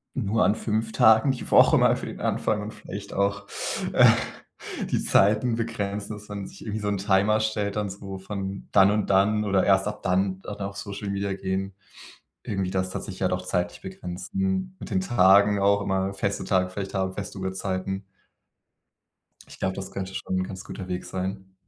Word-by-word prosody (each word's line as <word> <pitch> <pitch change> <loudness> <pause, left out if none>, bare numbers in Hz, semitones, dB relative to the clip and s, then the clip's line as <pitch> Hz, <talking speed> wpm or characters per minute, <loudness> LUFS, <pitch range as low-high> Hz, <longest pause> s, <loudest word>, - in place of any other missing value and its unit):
nur 110 -3 +1
an - - +4
5 110 0 -1
Tagen 110 +5 +5
die 125 - -6
Woche - - +7
mal - - +4
für - - -6
den - - -7
Anfang 105 -1 0
und 105 +1 -5
vielleicht 100 -1 -8
auch, 100 +1 0 0.5
äh, - - +7 0.9
die - - +1
Zeiten 110 +4 +3
begrenzen, 105 -3 -3
dass 105 0 -13
man 100 -1 -5
sich - - -14
irgendwie 110 0 -4
so 105 - -3
‘n 100 -1 0
Timer 100 +2 +3
stellt 110 -1 -1
und 105 -1 -1
so 95 0 -7
von 95 0 -5
dann 100 0 +6
und 105 -1 0
dann 100 +2 +3
oder 95 -2 +2
erst 95 0 +4
ab 105 - -5
dann 95 +1 +1
dann 105 - -6
auf 100 0 -4
Social 100 -3 -5
Media 100 0 -1
gehen. 95 0 -3 0.7
Irgendwie 95 -3 -2
das 95 0 -1
hat - - -3
sich 95 -3 -8
ja 95 -1 +1
auch 90 0 -1
zeitlich 90 -1 -2
begrenzen. 185 - -3
Mit - - -8
den 95 -4 +1
Tagen 100 0 +5
auch 100 +1 +4
immer, 95 0 -1
feste 100 0 -2
Tage 95 -1 +1
vielleicht 95 +1 -5
haben, 95 0 0
feste 100 0 -6
Uhrzeiten. 95 +1 -3 1.4
Ich - - -14
glaube, 95 0 -1
das 95 0 -6
könnte 95 -1 -5
schon 95 - -2
'n - - 0
ganz 95 0 -7
guter 95 -2 -7
Weg 90 -1 -4
sein. 95 0 -5
100 Hz, 190 wpm, -26 LUFS, 95-105 Hz, 1.4 s, Woche